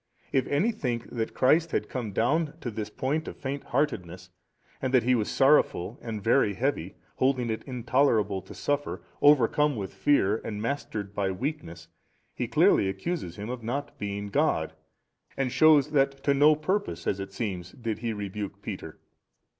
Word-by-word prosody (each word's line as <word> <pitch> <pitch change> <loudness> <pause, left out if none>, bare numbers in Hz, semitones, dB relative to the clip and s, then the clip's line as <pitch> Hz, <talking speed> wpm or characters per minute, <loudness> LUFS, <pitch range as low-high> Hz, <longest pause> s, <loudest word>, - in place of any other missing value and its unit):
If 135 - +1
any 160 +12 +2
think 120 - -3
that 115 -2 -3
Christ 160 +6 +4
had - - -1
come 120 -5 -4
down 145 +9 +1
to 120 - -4
this 105 -1 -4
point 140 +8 -2
of - - -7
faint 140 +1 -4
heartedness 95 - -2 0.5
and 130 - -1
that 125 - +5
He 125 +2 +3
was 110 -4 +1
sorrowful 135 -7 +3
and 110 -3 -5
very 115 -3 +3
heavy, 120 - -2 0.2
holding 130 -3 +1
it 110 - -3
intolerable 120 -6 +1
to - - -12
suffer, 145 0 -2 0.2
overcome 145 +1 +4
with 100 -4 -5
fear 110 -8 +2
and 105 -2 -6
mastered 110 -4 -3
by 100 -1 0
weakness, 90 - -5 0.5
he - - -3
clearly 95 - +4
accuses 95 - -4
Him 105 +4 -5
of 125 -1 -5
not 140 +6 -4
being 100 0 -4
God, 100 - +1 0.6
and 135 -2 0
shews 150 -1 +5
that 135 -2 +1
to 140 - +3
no 150 +2 +6
purpose, 155 - -2
as 100 - 0
it 95 0 -6
seems, 95 -4 -4
did 115 -3 -4
He 115 0 -2
rebuke 105 -1 -5
Peter. - - -6
120 Hz, 170 wpm, -27 LUFS, 100-140 Hz, 0.6 s, no